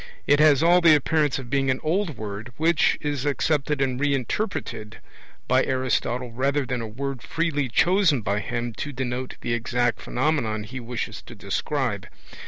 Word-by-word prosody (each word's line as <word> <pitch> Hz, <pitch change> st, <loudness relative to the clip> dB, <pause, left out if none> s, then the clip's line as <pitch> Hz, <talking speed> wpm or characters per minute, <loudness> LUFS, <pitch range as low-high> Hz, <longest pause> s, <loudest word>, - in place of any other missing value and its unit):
It 145 Hz, -, +4 dB
has 150 Hz, -1 st, +5 dB
all 175 Hz, +2 st, +5 dB
the 165 Hz, -3 st, +7 dB
appearance 150 Hz, 0 st, +1 dB
of 130 Hz, -2 st, -8 dB
being 135 Hz, -1 st, +1 dB
an 130 Hz, -, +1 dB
old 170 Hz, 0 st, 0 dB
word 105 Hz, +2 st, -6 dB
which 160 Hz, 0 st, +3 dB
is 145 Hz, -3 st, -2 dB
accepted 145 Hz, 0 st, 0 dB
and 130 Hz, -1 st, -1 dB
re 145 Hz, 0 st, +2 dB
interpreted 125 Hz, -, -3 dB, 0.5 s
by -, -, +4 dB
Aristotle 125 Hz, -1 st, -1 dB
rather 135 Hz, +3 st, 0 dB
than 125 Hz, -1 st, -3 dB
a 115 Hz, -, -4 dB
word 135 Hz, +3 st, -5 dB
freely 155 Hz, -5 st, -1 dB
chosen 170 Hz, -, +3 dB
by 100 Hz, 0 st, -1 dB
him 120 Hz, +3 st, -3 dB
to 145 Hz, -, -4 dB
denote 130 Hz, -1 st, -4 dB
the 120 Hz, -, -2 dB
exact 120 Hz, +1 st, 0 dB
phenomenon 120 Hz, -6 st, -1 dB
he 130 Hz, +5 st, -7 dB
wishes 120 Hz, -1 st, -5 dB
to -, -, -12 dB
describe. -, -, -2 dB
135 Hz, 170 wpm, -24 LUFS, 120-150 Hz, 0.5 s, the